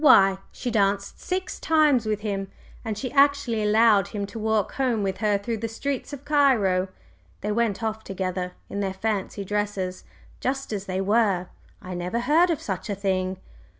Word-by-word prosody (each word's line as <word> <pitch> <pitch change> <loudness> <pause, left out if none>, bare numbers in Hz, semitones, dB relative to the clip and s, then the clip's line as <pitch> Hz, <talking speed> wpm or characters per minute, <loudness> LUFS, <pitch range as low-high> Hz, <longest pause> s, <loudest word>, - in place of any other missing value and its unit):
Why, 195 -9 +7
she 245 - -4
danced 200 -2 +1
six 375 0 -3
times 300 -8 +3
with 210 -1 -1
him! 200 -2 -2 0.4
And 220 -3 -3
she 255 +3 -4
actually 280 -5 +3
allowed 210 -1 +4
him 205 -2 -3
to 225 +3 -8
walk 220 -2 +1
home 245 -6 0
with 190 -1 -1
her 210 -2 +2
through 225 +3 -3
the 230 - -2
streets 265 +6 -3
of 285 -1 -8
Cairo! 240 -11 +3 0.5
They 210 - -1
went 225 -1 0
off 220 0 -2
together, 185 -2 -3
in 200 - -4
their 190 -1 -2
fancy 200 -1 -2
dresses, 205 -2 -2 0.4
just 270 -2 -2
as 200 -1 -4
they 185 0 -1
were! 195 -3 +2 0.3
I 185 - -6
never 180 +6 -2
heard 315 +8 +4
of 330 - 0
such 190 +2 -4
a 200 - -1
thing!" 190 -1 -1
210 Hz, 180 wpm, -25 LUFS, 195-240 Hz, 0.5 s, Why